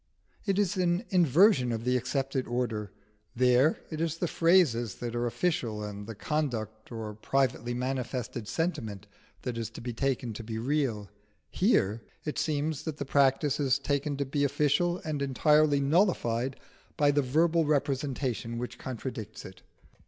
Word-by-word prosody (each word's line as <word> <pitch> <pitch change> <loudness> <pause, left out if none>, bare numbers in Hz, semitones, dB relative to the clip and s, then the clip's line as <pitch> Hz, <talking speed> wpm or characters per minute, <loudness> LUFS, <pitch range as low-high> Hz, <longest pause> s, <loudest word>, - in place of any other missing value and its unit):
It 195 -1 +2
is 200 -3 +1
an 180 +3 +1
inversion 175 - +5
of 115 -1 -3
the 125 +1 +1
accepted 135 +1 -1
order: 115 -4 -2 0.4
there 125 +5 +4
it 155 0 -3
is 165 -1 -1
the 175 - -1
phrases 155 - +3
that 120 -1 -5
are 120 0 0
official 115 -7 -1
and 105 0 -6
the 115 - -6
conduct 110 -6 -3
or 110 -2 -5
privately 120 +1 0
manifested 125 -2 -3
sentiment 110 - -2 0.4
that 120 -2 -3
is 115 -2 -3
taken 120 +1 -2
to 115 - -7
be 110 0 -5
real; 120 -5 -1 0.4
here 115 - +2 0.2
it 150 - -2
seems 150 -1 -1
that 155 -3 -4
the 140 - -4
practice 140 +1 +2
is 135 -2 +3
taken 140 +1 -1
to 140 - -1
be 145 +2 -1
official 150 +5 +2
and 150 -2 -2
entirely 150 +2 +3
nullified 135 - +1 0.4
by 145 -1 +4
the 145 0 +2
verbal 160 +5 +2
representation 135 -5 -1
which 125 +1 -5
contradicts 115 -4 -6
it. 95 - -11
135 Hz, 150 wpm, -29 LUFS, 115-150 Hz, 0.4 s, inversion